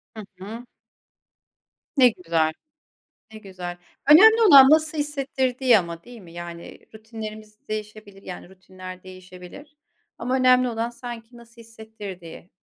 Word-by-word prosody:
Hı 215 - -8 0.2
hı. 225 +5 -9 1.3
Ne 250 -2 +6
güzel, 165 -6 -1 0.8
ne 220 - -9
güzel. 180 -3 -8 0.3
Önemli 440 +9 +8
olan 275 -4 +9
nasıl 310 0 +2
hissettirdiği 265 -4 0
ama, 170 -2 -5
değil 240 -3 -13
mi? 170 -2 -15
Yani 170 0 -10
rutinlerimiz 215 -1 -10
değişebilir 215 -2 -8
yani 180 0 -10
rutinler 185 0 -12
değişebilir 185 - -13 0.4
ama 250 +2 -2
önemli 255 -1 +3
olan 230 0 -3
sanki 240 -1 -10
nasıl 235 0 -17
hissettirdiği. 210 -6 -11
220 Hz, 120 wpm, -23 LUFS, 185-250 Hz, 1.3 s, olan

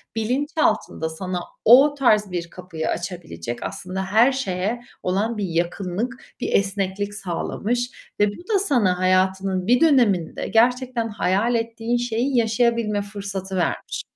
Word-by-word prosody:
bilinçaltında 255 - 0
sana 180 +2 -4 0.3
o 270 +6 +8
tarz 210 -6 +3
bir 170 -1 -3
kapıyı 180 -3 -5
açabilecek, 165 - -5
aslında 190 0 -4
her 220 +7 +4
şeye 225 -3 -2 0.2
olan 210 +5 0
bir 205 - -1
yakınlık, 180 +8 -2
bir - - -2
esneklik 200 +1 0
sağlamış 215 +6 -3
ve 205 - +5
bu 345 - -11
da 395 - +4
sana, 230 - +2
hayatının 185 0 +1
bir 245 +2 +4
döneminde 235 - +3
gerçekten 245 0 +2
hayal 210 +3 +1
ettiğin 230 +1 -1
şeyi 245 +2 0
yaşayabilme 230 -2 +1
fırsatı 200 -2 -6
vermiş. 180 - -2
205 Hz, 125 wpm, -22 LUFS, 185-240 Hz, 0.3 s, o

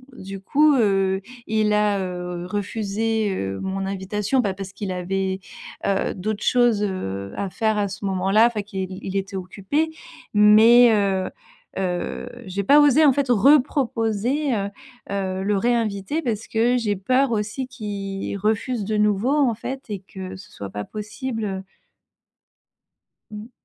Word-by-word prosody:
du 195 -3 -8
coup, 295 +9 +3
heu, 195 -4 +2 0.3
il 215 -1 +2
a, 210 -1 +2
heu, 180 -1 -4
refusé, 210 +2 -1
heu, 95 - -3
mon 190 0 -3
invitation, 200 +6 -1
bah, 200 -5 -1
parce 190 0 -8
qu'il 200 -1 -4
avait, 190 +1 -2 0.5
heu, 195 -1 0
d'autres 210 +2 -3
choses, 240 -4 +3
heu, 100 - -4
à 200 - -3
faire 220 0 0
à 205 - +1
ce 195 +1 -7
moment-là 195 +3 +3
enfin 230 -3 -2
qu'il 190 -2 -5
il 190 - -5
était 195 +1 -3
occupé 195 - -2 0.4
mais 220 +3 +7
heu 195 -3 +1 0.5
heu, 185 +5 -3 0.2
j'ai 190 +2 -3
pas 285 +9 +6
osé 290 +1 +6
en 285 -3 +6
fait, 275 -1 -1
reproposer, 250 +1 +2
heu 200 -3 -1 0.4
heu, 190 -1 -2
le 205 0 +1
réinviter 230 +4 0
parce 225 -6 -3
que 235 +3 +2
j'ai 215 -4 0
peur 255 +7 +1
aussi 220 +4 -2
qu'il 200 -5 -5
refuse 215 +3 -1
de 215 +2 -1
nouveau 210 +4 +2
en 280 -6 +3
fait, 265 +4 -5
et 205 - -2
que 190 -1 -8
ce 185 0 -13
soit 100 - -7
pas 105 +2 -5
possible 210 - -5 1.7
Mmh. 210 +2 -9
205 Hz, 150 wpm, -23 LUFS, 190-230 Hz, 1.7 s, mais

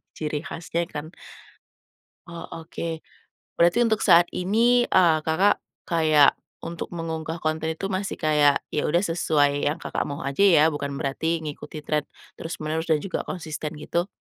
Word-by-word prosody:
ciri 150 -1 -3
khasnya 170 -1 -4
kan. 155 -1 -7 1.2
Oh 170 0 -8
oke, 165 0 -6 0.6
berarti 175 +8 +5
untuk 220 -2 +1
saat 175 -2 +6
ini, 235 +6 +2
eee, 170 -4 +5
Kakak, 170 +7 +2 0.2
kayak 155 -4 +4 0.3
untuk 170 0 -5
mengunggah 160 -1 -4
konten 160 -1 -2
itu 195 +2 -4
masih 195 +1 -2
kayak 150 -2 +3
ya 150 - 0
udah 175 +5 +2
sesuai 145 -4 +1
yang, 155 - -2
Kakak, - - -3
mau 140 -1 -5
aja 140 +6 -3
ya, 180 -7 +6
bukan 140 -1 -4
berarti 160 +4 -2
mengikuti 150 0 -7
trend 150 -1 -1 0.3
terus-menerus 160 0 -4
dan 160 - +4
juga 195 - -4
konsisten 155 -3 -5
gitu. 170 +4 -2
160 Hz, 150 wpm, -24 LUFS, 150-175 Hz, 1.2 s, saat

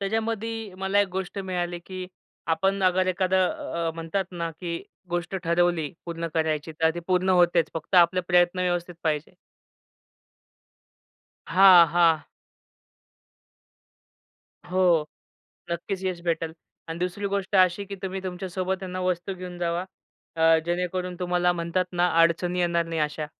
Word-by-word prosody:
त्यांच्यामधी 225 +1 -2
मला 195 +1 +2
एक 200 - +1
गोष्ट 190 +1 -4
मिळाली, 180 -2 -3
की 185 +1 -7 0.4
आपण 195 +4 +1
अगर 185 0 +3
एखादं 185 0 +2 0.4
अ, - - 0
म्हणतात 165 +4 -2
ना, 170 -2 -4
की 170 +1 -5 0.3
गोष्ट 175 +2 -2
ठरवली 170 -2 +1
पूर्ण 170 0 -4
करायची, 160 -1 -1
तर 160 - +4
ती 175 - -4
पूर्ण 185 0 +1
होतेच. 175 -3 +3
फक्त 165 +4 -5
आपले 180 +1 +5
प्रयत्न 175 +1 +3
व्यवस्थित 175 -1 -1
पाहिजे. 150 -1 -1 2.1
हां, 180 0 +8
हां. 165 -1 +3 2.5
हो. 180 -4 +3 0.7
नक्कीच 185 +3 -3
यश 180 -2 -2
भेटेल 165 -1 -1 0.4
आणि 165 - -5
दुसरी 180 +3 -2
गोष्ट 200 0 0
अशी, 185 +1 +4
की 200 0 -7
तुम्ही 190 0 -3
तुमच्यासोबत 185 +1 -3
आहे 185 - -5
ना, 185 - -3
वस्तू 180 +1 -1
घेऊन 180 -1 -8
जावा, 170 +1 -1 0.5
अ, 160 0 +5
जेणेकरून 180 +1 -2
तुम्हाला 180 0 +2
म्हणतात 170 +1 -1
ना, 175 0 +2
अडचणी 175 +2 +2
येणार 170 -1 +1
नाही 165 -1 -3
अशा. 150 0 -2
180 Hz, 135 wpm, -25 LUFS, 170-185 Hz, 2.5 s, हां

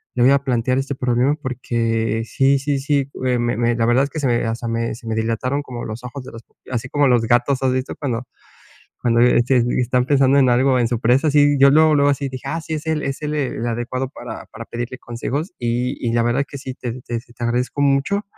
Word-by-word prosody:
le 120 - +2
voy 130 - +6
a 140 0 +3
plantear 125 -1 0
este 135 +1 -3
problema, 125 +2 +1
porque 115 -3 -1
sí 135 +3 +2
sí 140 0 -1
sí, 140 -1 0 0.2
eh, 125 -1 +1
me 120 -1 0
me 120 0 +1
la 115 -1 +1
verdad 125 +3 +4
es 140 - -7
que 155 - -4
se 140 - 0
me 120 -1 +1
hasta 115 +1 -3
me 115 0 -1
se 115 -1 -12
me 110 - -1
dilataron 115 +5 -1
como 125 -4 -7
los 110 +2 -7
ojos, 125 +2 -7
de - - -10
las 115 - -10
pupi - - -22
así 120 +1 -2
como 145 0 +2
los 120 -2 +3
gatos, 120 +4 +1
¿has 130 -1 +2
visto 130 0 -3
cuando 125 -4 -3 0.8
cuando, 115 -1 +2
eh, 125 - +5
este, 120 0 +3 0.2
están 125 +1 +1
pensando 135 -1 +4
en 130 -2 +5
algo, 130 +2 +3
en 120 - +2
su 120 -1 -1
presa? 125 +6 +3
Así, 145 -1 +4
yo 140 0 +8
luego, 155 +1 +5
luego 145 0 +4
así, 140 0 -1
dije: 130 -1 -7
"Ah, 165 +1 -2
sí, 160 0 -5
es 155 +1 -5
él 155 -1 0
es 135 +1 -3
él, 150 0 -2
el 130 -5 -2
adecuado 120 +2 -2
para - - -8
para - - -10
pedirle 120 +2 -5
consejos". 130 +9 -4
Y 120 +2 -1
y 115 - 0
la 120 0 +2
verdad 120 +4 +1
que 140 - -8
sí 130 -1 -7
te 120 -3 -5
te 120 -1 -3
te 120 0 -9
agradezco 125 +4 -1
mucho 145 +9 +1
125 Hz, 250 wpm, -20 LUFS, 120-140 Hz, 0.8 s, yo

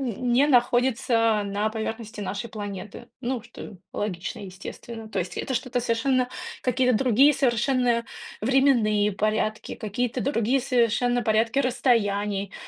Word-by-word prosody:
не 250 +2 +1
находится 240 -4 +2
на 205 +2 -1
поверхности 220 -1 -5
нашей 200 +4 -4
планеты. 205 -2 -7
Ну, 245 -2 -2
что 235 -4 -11 0.2
логично, 195 +2 -4
естественно. 220 +4 -9
То - - -4
есть 180 - -3
это 260 - -3
что-то 250 +1 -1
совершенно, 250 +2 +1 0.3
какие-то 250 -1 +2
другие 270 +4 +5
совершенно 245 -2 +1 0.4
временные 225 -5 +3
порядки, 215 +1 -1
какие-то 240 +4 -2
другие 260 -1 +1
совершенно 245 -1 +1
порядки 225 +3 +1
расстояний, 210 -6 +1
235 Hz, 120 wpm, -25 LUFS, 210-255 Hz, 0.4 s, другие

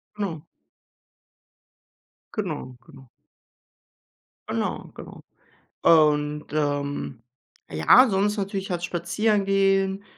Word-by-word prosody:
Genau. 185 -7 -4 1.9
Genau, 155 - -4
genau. 130 -2 -16 1.4
Genau, - - -3
genau. - - -11 0.6
Und, 150 -2 +3
ähm, 145 -4 -2 0.5
ja, 80 - +6
sonst 205 +2 +1
natürlich 195 -1 -4
halt 175 -1 -3
spazieren 195 +4 0
gehen, 195 0 +1
175 Hz, 75 wpm, -24 LUFS, 150-195 Hz, 1.9 s, ja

